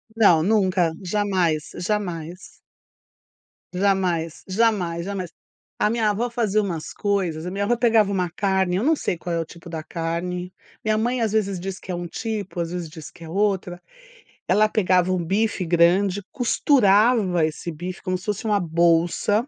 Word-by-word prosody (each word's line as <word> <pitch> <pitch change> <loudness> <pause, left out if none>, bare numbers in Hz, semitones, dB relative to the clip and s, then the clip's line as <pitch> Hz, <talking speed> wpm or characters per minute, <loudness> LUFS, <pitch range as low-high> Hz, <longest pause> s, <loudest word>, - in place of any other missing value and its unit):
Não, 175 -8 +5
nunca. 185 -4 +2
Jamais, 185 -5 0 0.2
jamais. 180 -4 -2 1.5
Jamais, 180 -3 +1 0.2
jamais, 185 -5 +1
jamais. 190 -3 -4 0.5
A - - +2
minha 225 -1 +1
avó 230 +4 -1
fazia 215 -3 +1
umas 170 -6 -4
coisas 185 -6 -1
a 180 - -4
minha 200 +1 -1
avó 240 - +2
pegava 225 -4 +3
uma 180 -3 0
carne, 190 0 0
eu 200 - -1
não 320 +4 +3
sei 180 - -2
qual 170 +1 -4
é - - 0
o - - 0
tipo 170 +1 -13
da 160 -2 -5
carne, 180 +2 -4 0.3
minha 215 0 +1
mãe 240 +3 0
às 220 -2 0
vezes 200 -4 0
diz 190 +1 -5
que 190 - -8
é - - -2
um 175 0 -5
tipo, 205 -1 -4
às 165 0 -3
vezes 175 -2 -4
diz 155 0 -10
que 170 - -14
é - - -10
outra. 185 -2 -1 0.7
Ela 215 +3 +4
pegava 185 -3 +2
um 180 -2 0
bife 195 +1 0
grande, 180 +4 +3
costurava 215 - +3
esse 160 +2 -4
bife 175 +4 -7
como 185 -2 -1
se 180 - -13
fosse 210 +2 -3
uma 210 -2 +2
bolsa 170 - +2
185 Hz, 175 wpm, -23 LUFS, 175-210 Hz, 1.5 s, Não